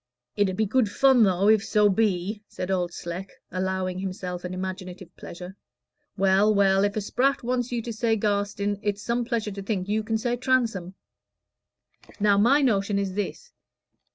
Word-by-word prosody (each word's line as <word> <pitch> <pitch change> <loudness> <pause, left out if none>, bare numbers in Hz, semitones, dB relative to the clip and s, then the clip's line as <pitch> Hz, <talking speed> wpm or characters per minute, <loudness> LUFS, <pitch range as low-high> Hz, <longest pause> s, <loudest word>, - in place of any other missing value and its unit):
"It 205 -2 +2
'ud 185 - -4
be 220 - +2
good 220 +1 +1
fun, 265 +3 +4
though, 195 -1 +3
if 215 -1 +5
so 210 -1 +3
be," 205 0 0
said 185 +1 -5
Old 180 -2 0
Sleck, 175 +3 -6 0.2
allowing 185 0 -2
himself 185 -2 -5
an 180 - -5
imaginative 185 -1 -6
pleasure. 180 +2 -9 0.6
"Well, 195 +2 +3
well, 195 -1 +4
if 205 0 0
a 215 - -1
Spratt 260 +7 0
wants 245 0 -1
you 235 -2 -2
to 235 - -5
say 225 +1 +1
Garstin, 205 -1 -1
it's 205 -1 -2
some 240 +1 0
pleasure 230 -3 -2
to 200 0 -6
think 195 -2 -3
you 215 +2 0
can 220 +1 -1
say 240 +2 -1
Transome. 230 -8 0 1.2
Now, 200 -1 +4
my 275 +7 +4
notion 200 -5 +1
is 195 -2 -2
this. 210 - -5
205 Hz, 175 wpm, -25 LUFS, 190-225 Hz, 1.2 s, if